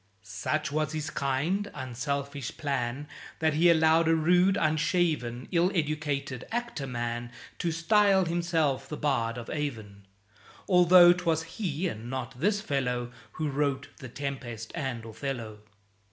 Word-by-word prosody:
Such 140 +9 -2
was 155 0 -1
his 155 0 -3
kind, 155 +10 -1
unselfish 140 +1 -4
plan, 140 -1 -2 0.3
That 160 -1 +1
he 165 +4 +5
allowed 160 0 +4
a 165 - +4
rude, 180 +4 +4
unshaven, 155 -6 0
Ill 175 +1 +3
educated 145 -5 -2
actor 235 - -3
man 120 -1 -3 0.3
To 170 - 0
style 195 +3 +3
himself 165 -5 0
the 150 - -4
Bard 120 -5 0
of 120 - -7
Avon; 110 -10 -5 0.6
Altho' 180 -1 +7
'twas 165 -3 0
he 165 0 -3
and 115 -5 -6
not 130 -1 -5
this 205 +6 +1
fellow 125 - -1 0.2
Who 155 - -2
wrote 140 -1 -1
"The 130 -4 -9
Tempest" 120 -5 -5
and 130 -8 -4
"Othello." 115 -2 -5
150 Hz, 135 wpm, -28 LUFS, 125-165 Hz, 0.6 s, Altho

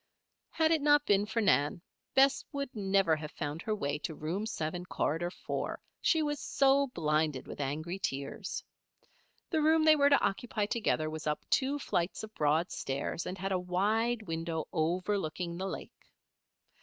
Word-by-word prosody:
Had 320 -1 +2
it 320 -2 +3
not 295 0 +5
been 205 0 +3
for 225 +1 0
Nan, 150 -4 +3 0.4
Bess 270 +1 +5
would 280 -3 -4
never 195 -5 +3
have 150 0 -6
found 150 +2 -4
her 215 - -1
way 145 -6 -2
to 155 +2 -4
Room 175 +9 -3
Seven, 175 -3 -3
Corridor 175 -1 -1
Four, 180 - -4 0.2
she 320 -2 +3
was 295 -1 -1
so 275 0 +3
blinded 155 - 0
with - - -6
angry 155 +7 -3
tears. 140 -5 -3 0.9
The 320 -3 +2
room 315 +1 +4
they 310 -1 +8
were 285 -1 +5
to 280 - +6
occupy 210 +1 -1
together 205 -8 0
was 155 0 -5
up 150 0 -2
two 275 +2 +2
flights 175 -10 -1
of 220 0 -8
broad 155 +2 +1
stairs, 140 +5 -3
and 185 - -4
had 195 +1 -3
a 185 - +2
wide 215 +6 +1
window 165 -2 -3
overlooking 175 +1 -1
the 190 +2 -3
lake. - - -8
190 Hz, 170 wpm, -31 LUFS, 155-240 Hz, 0.9 s, they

